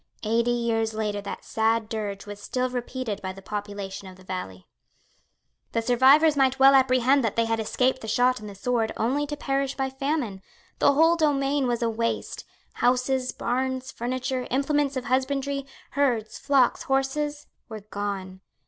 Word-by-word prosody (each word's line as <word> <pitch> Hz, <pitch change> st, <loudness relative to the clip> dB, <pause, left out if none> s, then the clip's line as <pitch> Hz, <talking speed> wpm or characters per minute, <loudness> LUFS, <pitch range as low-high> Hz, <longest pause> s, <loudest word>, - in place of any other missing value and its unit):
Eighty 230 Hz, +2 st, +1 dB
years 225 Hz, -2 st, 0 dB
later 210 Hz, -2 st, -2 dB
that 200 Hz, -, -7 dB
sad 225 Hz, 0 st, +1 dB
dirge 210 Hz, -3 st, -4 dB
was 205 Hz, 0 st, -9 dB
still 255 Hz, +3 st, -2 dB
repeated 245 Hz, -3 st, -4 dB
by 190 Hz, -, -4 dB
the 195 Hz, -, -11 dB
population 200 Hz, -2 st, -5 dB
of 185 Hz, -, -11 dB
the 185 Hz, -, -17 dB
valley. 180 Hz, -, -6 dB, 1.1 s
The 230 Hz, -, +1 dB
survivors 270 Hz, +6 st, +5 dB
might 265 Hz, -1 st, +3 dB
well 270 Hz, +1 st, +7 dB
apprehend 260 Hz, 0 st, +4 dB
that 225 Hz, -, -1 dB
they 230 Hz, -, +2 dB
had 225 Hz, 0 st, 0 dB
escaped 255 Hz, +4 st, 0 dB
the 220 Hz, -, -7 dB
shot 250 Hz, +3 st, +2 dB
and 210 Hz, -1 st, -8 dB
the 200 Hz, -, -10 dB
sword 225 Hz, +2 st, 0 dB
only 275 Hz, +6 st, 0 dB
to 295 Hz, 0 st, -5 dB
perish 275 Hz, -1 st, -1 dB
by 265 Hz, -1 st, -2 dB
famine. 265 Hz, -7 st, -2 dB, 0.4 s
The -, -, +5 dB
whole 325 Hz, +4 st, +4 dB
domain 285 Hz, -3 st, +1 dB
was 240 Hz, -1 st, 0 dB
a 230 Hz, -, +2 dB
waste. 230 Hz, +1 st, -3 dB, 0.3 s
Houses, 255 Hz, +1 st, +1 dB
barns, 260 Hz, +1 st, -2 dB
furniture, 255 Hz, +1 st, -3 dB
implements 280 Hz, +1 st, +1 dB
of 255 Hz, -, -3 dB
husbandry, 275 Hz, +1 st, -1 dB, 0.2 s
herds, 250 Hz, -6 st, 0 dB
flocks, 275 Hz, -3 st, +3 dB
horses, 290 Hz, +2 st, -1 dB, 0.2 s
were 220 Hz, -2 st, -7 dB
gone. 200 Hz, -2 st, -5 dB
250 Hz, 165 wpm, -26 LUFS, 220-270 Hz, 1.1 s, well